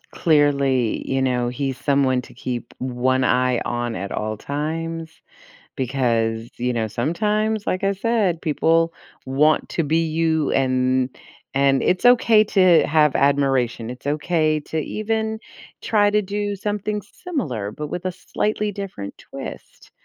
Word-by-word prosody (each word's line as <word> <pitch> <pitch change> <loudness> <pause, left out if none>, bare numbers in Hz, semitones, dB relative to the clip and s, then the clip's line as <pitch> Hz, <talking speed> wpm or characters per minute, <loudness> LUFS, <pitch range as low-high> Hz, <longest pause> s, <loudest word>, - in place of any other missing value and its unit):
Clearly, 140 -6 +2
you 135 0 +1
know, 125 -2 +1
he's 135 +1 -3
someone 135 -3 +2
to - - -15
keep 120 -2 -5
1 130 +1 0
eye 125 -1 +2
on 120 -1 -2
at 100 0 -5
all 110 0 -3
times 160 +4 -4 0.6
because, 115 -4 0
you 125 +1 0
know, 115 -2 -1
sometimes, 210 - -1
like 185 - -1
I 195 0 +2
said, 200 -5 0
people 165 +1 +2 0.3
want 150 +4 +2
to 165 - 0
be 160 +3 +1
you, 160 -1 +1
and 130 -1 +1 0.4
and 135 -1 +3
it's 185 - +1
okay 230 -3 +6
to 185 -5 +4
have 150 -2 +3
admiration. 135 -4 +1
It's 125 +2 -10
okay 155 +1 +1
to 160 +2 -5
even 220 +6 -2 0.4
try 205 -2 +3
to 210 0 +2
do 205 +1 -2
something 210 +1 -3
similar 140 - -4
but 150 +4 -6
with 180 +4 -5
a 185 - -1
slightly 210 +3 -2
different 190 - -7
twist. - - -10
150 Hz, 140 wpm, -22 LUFS, 130-185 Hz, 0.6 s, okay